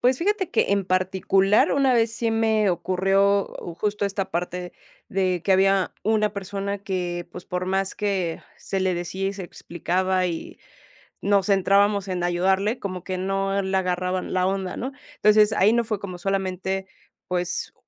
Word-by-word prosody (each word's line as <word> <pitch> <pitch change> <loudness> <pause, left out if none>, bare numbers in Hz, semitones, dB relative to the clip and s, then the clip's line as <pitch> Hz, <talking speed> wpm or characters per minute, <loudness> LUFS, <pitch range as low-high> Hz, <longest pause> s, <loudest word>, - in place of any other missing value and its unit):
Pues, 255 +1 +3
fíjate 395 0 0
que - - +2
en 200 -1 +1
particular 190 +2 +2
una 275 -2 +3
vez 225 -1 +2
sí 230 -1 -1
me 220 -2 +2
ocurrió, 195 +3 +2
uh, 170 - -7
justo, 210 +2 -1
esta 195 -1 -2
parte 180 +1 -3 0.4
de 185 -4 0
que 195 - +3
había 195 0 +3
una 215 -1 +2
persona 200 0 -4
que, 180 -3 -3
pues, 180 - -9
por 180 0 -3
más 190 0 0
que 190 -5 -2
se 195 - -3
le 185 -1 +1
decía 185 +3 -3
y - - -3
se 195 -2 -7
explicaba 185 +2 -1
y 170 -2 -5 0.6
nos 200 0 +2
centrábamos 200 +1 +3
en 180 -2 -2
ayudarle, 190 +6 +1
como 185 -3 -5
que 185 -1 -3
no 195 +1 0
le 190 0 -2
agarraba 185 0 0
la 185 0 0
onda, 190 -1 -2
¿no? 260 +3 -4 0.2
Entonces, 210 -2 +5
ahí 210 +3 +4
no 235 0 +2
fue 215 -3 -3
como 185 -3 -6
solamente, 190 0 -2 0.4
pues, 180 0 -2
195 Hz, 170 wpm, -24 LUFS, 185-205 Hz, 0.6 s, Entonces